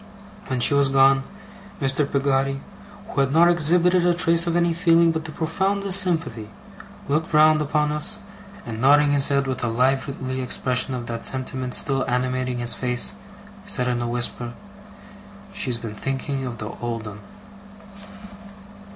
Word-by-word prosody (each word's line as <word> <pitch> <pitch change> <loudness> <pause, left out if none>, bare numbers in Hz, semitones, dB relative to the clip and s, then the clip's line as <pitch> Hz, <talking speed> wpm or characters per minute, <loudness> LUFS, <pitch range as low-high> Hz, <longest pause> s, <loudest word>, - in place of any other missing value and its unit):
When 130 - -2
she 120 - +3
was 140 -1 +3
gone, 135 0 +4 0.6
Mr. 140 +1 0
Peggotty, 135 0 0 0.5
who 140 - -1
had 135 -1 0
not 170 +3 +5
exhibited 175 +2 +3
a 175 -1 +2
trace 170 0 +2
of 170 - 0
any 170 -1 +2
feeling 170 -1 +3
but 160 -1 -4
the 160 - -5
profoundest 195 +5 0
sympathy, 160 - -2 0.6
looked 155 +2 -1
round 155 0 +5
upon 150 0 0
us, 150 0 -1 0.5
and 115 -1 -6
nodding 145 +2 +4
his 140 -1 +2
head 140 -1 +1
with 130 -2 -3
a - - 0
lively 130 +2 -1
expression 125 +1 0
of 120 -1 -6
that 115 -1 -5
sentiment 130 -1 -1
still 135 -1 +4
animating 125 0 -1
his 120 -1 +1
face, 125 -1 0 0.5
said 145 -11 -1
in 120 -1 -1
a 120 - -2
whisper: 120 0 -2 1.0
'She's 130 - -2
been 115 -2 -7
thinking 135 +3 -4
of 120 -1 -6
the 105 -1 -5
old 115 -2 -4
'un! 105 -1 -9
135 Hz, 155 wpm, -22 LUFS, 125-160 Hz, 1.0 s, not